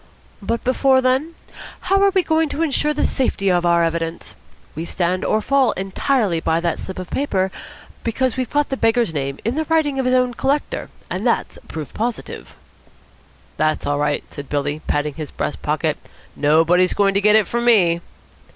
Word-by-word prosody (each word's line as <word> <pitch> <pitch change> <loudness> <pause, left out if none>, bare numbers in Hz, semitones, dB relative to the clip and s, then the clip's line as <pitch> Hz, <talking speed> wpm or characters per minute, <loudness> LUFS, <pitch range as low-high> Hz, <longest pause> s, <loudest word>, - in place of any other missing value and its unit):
"But 230 +3 -2
before 260 +1 +3
then? 260 +6 +1 0.5
How 390 +1 +2
are 400 - +5
we 380 -2 +2
going 320 -1 +1
to 320 - -1
ensure 300 -1 +1
the 300 - -1
safety 195 -7 +1
of 175 -1 +2
our 170 0 +4
evidence? 165 0 -3 0.4
We 160 - -5
stand 180 +1 -1
or 215 0 +1
fall 275 -4 +3
entirely 195 - 0
by 160 0 +1
that 170 -1 -1
slip 190 - -7
of 185 -1 -7
paper, 190 -9 0 0.5
because 245 +1 0
we've 255 -2 -2
got 290 0 +1
the 270 - -2
beggar's 225 -5 +2
name 140 -2 -3
in 230 - +1
the 315 +3 -1
writing 305 -3 +1
of 260 - 0
his 255 - +3
own 250 -1 +2
collector, 275 +5 -1 0.2
and - - -1
that's - - -1
proof 155 -3 -7
positive." 235 +1 -4 1.0
"That's 155 0 0
all 145 0 0
right," 145 0 0
said 140 -1 -8
Billy, 145 +1 -2
patting 145 0 0
his 155 -1 -6
breast - - -4
pocket. - - -1 0.4
"Nobody's 165 +5 +3
going 200 -1 +3
to 200 - +1
get 210 +1 +5
it 215 -2 +5
from 235 0 -2
me." 175 -8 +4
210 Hz, 185 wpm, -20 LUFS, 170-265 Hz, 1.0 s, are